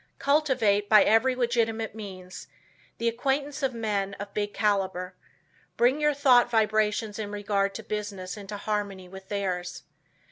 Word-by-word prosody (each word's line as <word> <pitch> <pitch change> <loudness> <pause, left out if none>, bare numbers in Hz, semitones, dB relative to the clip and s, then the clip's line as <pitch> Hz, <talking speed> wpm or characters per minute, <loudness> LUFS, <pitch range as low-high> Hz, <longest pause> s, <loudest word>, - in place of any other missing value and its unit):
Cultivate, 255 -9 +2
by 215 -2 +8
every 250 +4 +3
legitimate 230 -3 0
means, 185 -4 -9 0.5
the 230 - -1
acquaintance 275 +5 -1
of 265 -3 -1
men 200 -3 -2
of 200 0 -8
big 205 -1 -2
caliber. 190 -3 -1 0.6
Bring 255 +5 +3
your 300 -1 +2
thought 255 -4 +5
vibrations 215 -1 +1
in 210 -2 -4
regard 200 -1 -1
to - - -6
business 205 -3 -5
into 205 0 -7
harmony 200 -3 -3
with 190 +1 -12
theirs. 185 -3 -3
210 Hz, 140 wpm, -27 LUFS, 200-235 Hz, 0.6 s, by